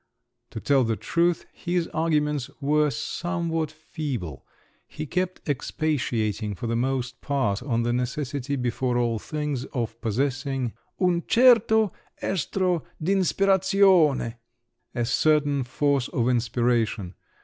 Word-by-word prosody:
To - - -6
tell 135 +2 +3
the 115 -1 0
truth, 170 - 0
his 175 -1 -1
arguments 150 -4 0
were 150 +1 +2
somewhat 165 +4 -2
feeble; 145 - -6 0.4
he 155 - -6
kept 180 +4 -3
expatiating 120 -8 -1
for 105 - -6
the 115 0 -1
most 125 0 -2
part 115 -9 0
on 120 -3 0
the 120 0 0
necessity, 130 +2 -2
before 125 -1 -1
all 120 -2 +1
things, 150 -1 -3
of 115 -3 -4
possessing 130 +1 -1 0.3
"un 180 -2 +2
certo 225 -4 +5 0.3
estro 180 -1 0 0.2
d'inspirazione"—a 165 - +1
certain 145 +2 +2
force 140 +1 0
of 120 -1 -1
inspiration! 115 -5 0
140 Hz, 110 wpm, -25 LUFS, 120-160 Hz, 0.4 s, certo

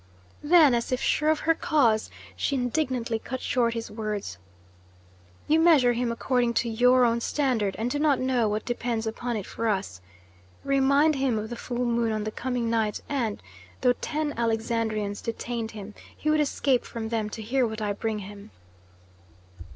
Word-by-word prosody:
Then, 300 -3 +6
as 235 +1 -1
if 255 - +1
sure 305 +3 +1
of 310 -1 +2
her 330 - +3
cause, 245 -10 +2 0.3
she 280 - -1
indignantly 245 -3 -1
cut 260 +3 -5
short 235 -2 0
his 230 0 -5
words: 210 - -4 1.1
"You 315 +1 +4
measure 305 -8 +5
him 240 0 -1
according 240 0 0
to 235 - +1
your 250 +2 +4
own 235 0 +1
standard, 235 -9 0
and 230 +3 -2
do 290 - -1
not 290 -3 +3
know 255 -4 +1
what 210 +1 -2
depends 235 -2 -2
upon 230 +1 -3
it 200 - -5
for 230 - -3
us. 195 - -2 0.6
Remind 280 +2 +3
him 265 -4 +1
of 215 +2 -4
the - - -3
full 245 +1 -3
moon 235 -1 +1
on 215 -1 -2
the 215 - -3
coming 245 0 -2
night 225 -2 0
and, 240 -7 -2 0.4
though 250 - +4
ten 300 +3 -3
Alexandrians 225 -2 -1
detained 230 0 -4
him, 210 -1 -9 0.2
he 305 - 0
would 310 0 +3
escape 275 -3 +1
from 225 -1 -6
them 220 -2 -1
to 220 +1 -7
hear 250 +3 +1
what 220 0 -5
I 210 -1 -1
bring 220 +1 -2
him." 200 - -11
235 Hz, 175 wpm, -26 LUFS, 220-265 Hz, 1.1 s, Then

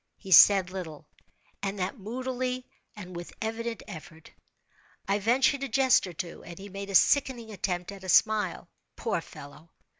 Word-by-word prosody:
He 190 - -11
said 190 +1 +8
little, 160 -5 -7 0.6
and 200 0 -3
that 190 +6 -3
moodily, 255 +3 -3 0.3
and 185 -4 -9
with 175 0 -7
evident 230 +1 -4
effort. 165 -4 -11 0.8
I 200 +1 +1
ventured 260 +6 +2
a 275 - -3
jest 260 -7 +3
or 180 - -8
two, 170 +1 -7
and 170 -1 -10
he 200 +1 -9
made 200 +1 -7
a 195 - -3
sickening 245 -2 +3
attempt 180 -2 -3
at 195 -1 -11
a 185 - -7
smile. 210 -2 +2 0.3
Poor - - -2
fellow! 145 +3 -13
200 Hz, 160 wpm, -28 LUFS, 180-235 Hz, 0.8 s, said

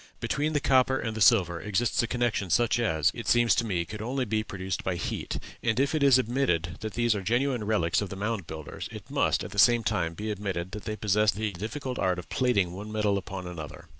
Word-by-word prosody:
Between 150 +3 -1
the 145 - +2
copper 130 -1 +3
and 110 -3 -3
the 110 - -4
silver 90 -7 +4
exists 105 +4 +1
a 120 - -1
connection 120 -5 -1
such 120 +7 +2
as, 80 -8 +2
it 115 - -7
seems 120 -1 +4
to 115 - +1
me, 90 -6 -1
could 105 +5 -7
only 130 +3 -1
be 110 -1 0
produced 95 -3 -4
by 95 - -1
heat; 85 - -3 0.2
and 115 +1 0
if 140 +3 +2
it 155 - 0
is 135 -2 +6
admitted 105 -9 0
that 110 -3 -6
these 120 -1 +2
are 105 - -3
genuine 120 +3 0
relics 85 -6 +1
of 105 - -4
the - - -6
Mound 105 -3 -3
Builders, 80 -2 -7
it - - -10
must, - - +1
at - - -7
the - - -3
same 120 -1 +6
time, 85 -5 -1
be 105 +3 -4
admitted 95 -3 -4
that 105 - -7
they 110 - -3
possessed 105 0 +2
the 105 0 -2
difficult 125 +8 -5
art 90 -1 +1
of 90 - -8
plating 100 -9 +1
one 105 +3 -7
metal 105 -2 +1
upon 95 -1 -5
another. 85 0 -8
105 Hz, 235 wpm, -28 LUFS, 90-120 Hz, 0.2 s, is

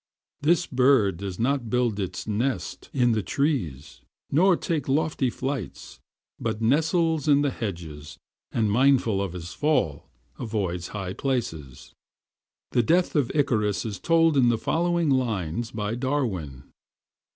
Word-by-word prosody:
This 170 +4 +3
bird 125 -8 +3
does 95 -1 -5
not 125 0 0
build 120 -3 +1
his 95 -3 -4
nest 110 -2 -2
in 125 -3 +2
the 110 -1 +1
trees, 95 - -2 0.3
nor 180 +4 +4
take 155 -5 -2
lofty 140 -1 +1
flights, 130 - -5 0.4
but 105 - -2
nestles 160 +5 +1
in 145 -1 +5
the 145 - +1
hedges, 85 - -6 0.3
and 110 -3 +1
mindful 120 -4 +3
of 95 -3 -3
his 90 -1 -7
fall, 115 - 0 0.3
avoids 95 -6 -2
high 95 -3 -5
places. 80 - -4 0.8
The 120 - +3
death 170 +10 +2
of 145 -5 +1
Icarus 105 -9 +1
is 105 -3 -4
told 165 -2 +3
in 125 -3 +5
the 115 - +2
following 170 +4 +1
lines 110 -5 -1
by 105 0 -3
Darwin 115 - -2
120 Hz, 135 wpm, -25 LUFS, 100-145 Hz, 0.8 s, in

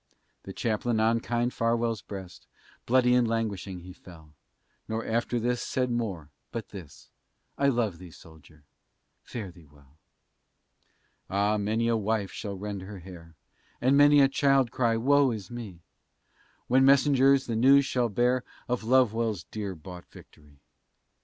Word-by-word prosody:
The 95 - -7
Chaplain 110 +2 -1
on 115 +1 +2
kind 120 +1 -1
Farwell's 115 -2 0
breast, 95 -3 -10 0.4
Bloody 125 0 +4
and 125 -1 +3
languishing 100 -5 -3
he 90 +1 -11
fell; 80 -5 -16 0.5
Nor 110 +1 -3
after 120 +1 -1
this 120 +1 -1
said 125 -1 -1
more, 95 -11 -3 0.2
but 115 -2 -6
this, 90 -8 -12 0.4
"I 140 - +1
love 115 -10 0
thee, 90 -1 -11
soldier, 80 -2 -17 0.6
fare 105 -6 -7
thee 85 -2 -18
well." 70 +1 -23 1.3
Ah! 100 +2 +1
many 110 +3 0
a 115 - +2
wife 105 -2 -1
shall 100 -2 -6
rend 100 0 -5
her 100 +2 -9
hair, 85 -3 -12 0.4
And 130 +3 +3
many 145 0 +6
a 135 - +6
child 135 -3 +2
cry, 115 -3 +1
"Wo 140 +3 +3
is 105 -4 -6
me!" 110 -8 -8 0.8
When 130 +2 +3
messengers 135 0 +4
the 115 - -3
news 135 +4 +5
shall 125 -3 0
bear, 125 +4 +1 0.2
Of 125 -2 -2
Lovewell's 115 -5 +1
dear 100 -3 -6
bought 90 +2 -11
victory. 75 -2 -18
115 Hz, 145 wpm, -27 LUFS, 95-125 Hz, 1.3 s, many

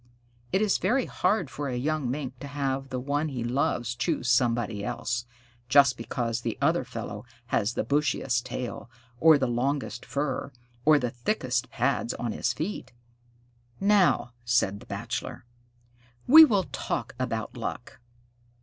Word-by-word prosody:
It 195 - +2
is 210 - +2
very 245 +7 +1
hard 185 - 0
for 145 +1 -4
a 125 - -2
young 145 0 -1
Mink 130 -1 -4
to 145 - -7
have 135 -1 -2
the 130 -1 -3
one 145 +4 -1
he 125 -4 -4
loves 120 -1 0
choose 140 +1 -1
somebody 120 -4 +1
else, 120 +1 -3 0.4
just 140 -1 +6
because 115 0 -3
the - - -3
other - - +2
fellow - - -6 0.3
has 110 +4 +1
the - - 0
bushiest 135 -2 0
tail, 120 -2 -5 0.3
or 160 -2 +7
the 135 - 0
longest 125 0 -1
fur, 140 -1 -3 0.3
or 155 0 +7
the 125 -4 -1
thickest 125 - -1
pads 125 0 0
on 120 -2 -3
his 120 - -1
feet. 160 +2 -5 0.9
"Now," 195 - +3
said 120 -5 +1
the - - -15
Bachelor, - - -5 0.8
"we 315 +5 +10
will 205 -9 +2
talk - - -3
about - - -3
luck. - - -6
130 Hz, 150 wpm, -27 LUFS, 120-150 Hz, 0.9 s, we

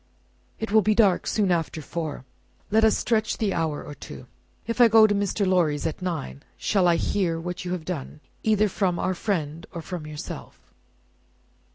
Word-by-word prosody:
"It 220 -1 -4
will 220 0 +6
be 215 +2 +2
dark 200 -5 +3
soon 205 -4 +1
after 165 -1 -1
four. 155 -3 -5 0.5
Let 220 +1 +4
us 220 - +5
stretch 220 -2 0
the 210 -3 0
hour 160 -3 -1
or 145 - -8
two. 70 - -10 0.4
If 230 +2 0
I 240 - +9
go 225 -1 +7
to 210 - +3
Mr. 200 0 0
Lorry's 170 -6 +2
at 160 +3 -3
nine, 165 -6 -4 0.2
shall 195 -4 +2
I 170 - +5
hear 170 -1 0
what 180 +2 -5
you 175 - -3
have 170 -3 -5
done, 155 -4 -5 0.2
either 215 -1 +3
from 185 -3 0
our 185 - 0
friend 170 -5 -2
or 170 -3 -6
from 175 -4 -6
yourself?" 150 -1 -9
180 Hz, 185 wpm, -25 LUFS, 160-210 Hz, 0.5 s, I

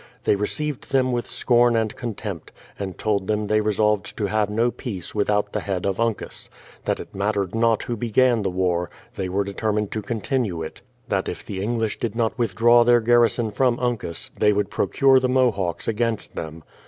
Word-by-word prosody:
They - - +3
received 140 +7 -2
them 130 -1 +2
with 120 -1 -2
scorn 120 -1 +3
and 110 -2 0
contempt, 105 - -6 0.3
and 95 -2 -5
told 100 -3 0
them 105 0 0
they 110 +1 +2
resolved 105 -1 0
to 105 - 0
have 105 +1 +1
no 115 +3 +1
peace 100 -10 -6
without 105 0 0
the - - 0
head 95 -3 -3
of 100 0 -1
Uncas; 115 -2 -2 0.4
that - - 0
it - - -9
mattered 100 -1 -1
not 115 -1 +2
who 120 - -3
began 120 +1 +2
the 100 - 0
war, 90 -1 0 0.3
they 95 -1 -3
were 100 +2 0
determined 105 +1 -2
to 110 - -2
continue 110 - -2
it; 80 - -8 0.3
that 95 -1 0
if - - -7
the 95 -2 -5
English 115 +1 -1
did 115 -2 -2
not 115 -2 0
withdraw 120 +1 +4
their 120 0 +5
garrison 120 -1 +3
from 125 +2 +1
Uncas, 120 -9 -2
they 105 - +5
would 105 0 0
procure 135 +6 +4
the 130 0 0
Mohawks 105 -10 +1
against 115 0 -1
them. 80 0 -6
110 Hz, 190 wpm, -23 LUFS, 100-120 Hz, 0.4 s, their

